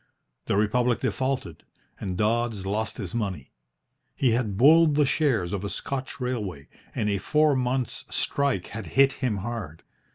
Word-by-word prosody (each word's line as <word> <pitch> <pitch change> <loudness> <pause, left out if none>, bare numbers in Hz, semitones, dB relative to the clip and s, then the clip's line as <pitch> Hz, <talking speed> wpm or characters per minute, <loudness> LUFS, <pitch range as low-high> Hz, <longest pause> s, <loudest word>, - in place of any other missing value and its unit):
The - - +1
Republic 120 +3 +2
defaulted, 130 - -2 0.4
and 90 -2 -4
Dodds 110 -1 0
lost 110 +2 -2
his - - -5
money. 100 - -3 0.6
He 130 -4 +2
had 110 -4 0
bulled 155 +4 +6
the 150 0 +4
shares 125 - +1
of 100 -1 -3
a 100 - -3
Scotch 135 +4 -4
railway, 105 - -4 0.3
and 105 - 0
a 100 -1 0
four 150 +5 +3
months' 125 -1 -1
strike 140 -10 0
had 105 -3 -6
hit 140 0 +6
him 120 -6 0
hard. 105 -10 -6
115 Hz, 155 wpm, -26 LUFS, 100-130 Hz, 0.6 s, bulled